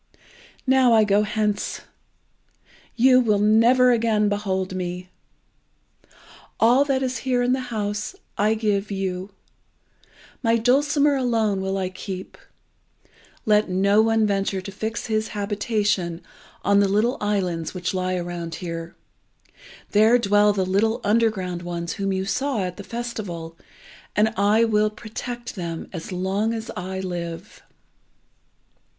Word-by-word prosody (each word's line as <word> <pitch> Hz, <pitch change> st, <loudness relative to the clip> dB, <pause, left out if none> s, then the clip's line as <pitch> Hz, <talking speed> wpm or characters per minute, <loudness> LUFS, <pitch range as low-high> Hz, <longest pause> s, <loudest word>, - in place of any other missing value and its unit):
"Now 260 Hz, -2 st, +4 dB
I 220 Hz, -1 st, +6 dB
go 205 Hz, 0 st, +3 dB
hence! 210 Hz, -1 st, -1 dB, 1.1 s
You 255 Hz, +1 st, +6 dB
will 220 Hz, -5 st, +2 dB
never 230 Hz, +5 st, +5 dB
again 225 Hz, -3 st, +2 dB
behold 190 Hz, -2 st, -2 dB
me! 180 Hz, 0 st, -5 dB, 1.5 s
All 245 Hz, +5 st, +5 dB
that 270 Hz, -2 st, 0 dB
is 255 Hz, 0 st, -2 dB
here 250 Hz, -2 st, 0 dB
in 250 Hz, +1 st, +2 dB
the 260 Hz, -, 0 dB
house 210 Hz, -, -3 dB, 0.2 s
I 215 Hz, +2 st, +2 dB
give 210 Hz, -2 st, -1 dB
you! 190 Hz, -1 st, -3 dB, 1.1 s
My 230 Hz, -2 st, +3 dB
dulcimer 285 Hz, +5 st, +3 dB
alone 225 Hz, -6 st, +1 dB
will 190 Hz, 0 st, -2 dB
I 185 Hz, -1 st, -1 dB
keep. 185 Hz, 0 st, -7 dB, 1.1 s
Let 210 Hz, -2 st, +3 dB
no 200 Hz, +3 st, +3 dB
one 225 Hz, 0 st, +2 dB
venture 195 Hz, -1 st, 0 dB
to 185 Hz, +2 st, -8 dB
fix 220 Hz, +3 st, -4 dB
his 220 Hz, -1 st, -1 dB
habitation 205 Hz, -4 st, -1 dB, 0.4 s
on 200 Hz, +1 st, +4 dB
the 200 Hz, -, +4 dB
little 215 Hz, +6 st, +1 dB
islands 185 Hz, -5 st, -1 dB
which 180 Hz, +1 st, -2 dB
lie 185 Hz, 0 st, -1 dB
around 175 Hz, -2 st, -4 dB
here. 165 Hz, -1 st, -6 dB, 1.0 s
There 220 Hz, +3 st, +5 dB
dwell 205 Hz, -2 st, +3 dB
the 195 Hz, -2 st, 0 dB
little 205 Hz, +5 st, +1 dB
underground 205 Hz, -5 st, +1 dB
ones 170 Hz, -1 st, -4 dB
whom 195 Hz, -2 st, -2 dB
you 190 Hz, 0 st, -1 dB
saw 255 Hz, 0 st, -1 dB
at 180 Hz, -1 st, -5 dB
the 200 Hz, -, -7 dB
festival, 200 Hz, -9 st, -6 dB, 0.6 s
and 215 Hz, +2 st, +4 dB
I 215 Hz, +1 st, +2 dB
will 215 Hz, -2 st, +2 dB
protect 240 Hz, +3 st, -7 dB
them 170 Hz, -3 st, -5 dB
as 170 Hz, 0 st, -6 dB
long 195 Hz, +5 st, -1 dB
as 225 Hz, 0 st, -5 dB
I 190 Hz, +1 st, -4 dB
live." 175 Hz, 0 st, -6 dB
205 Hz, 135 wpm, -23 LUFS, 185-225 Hz, 1.5 s, I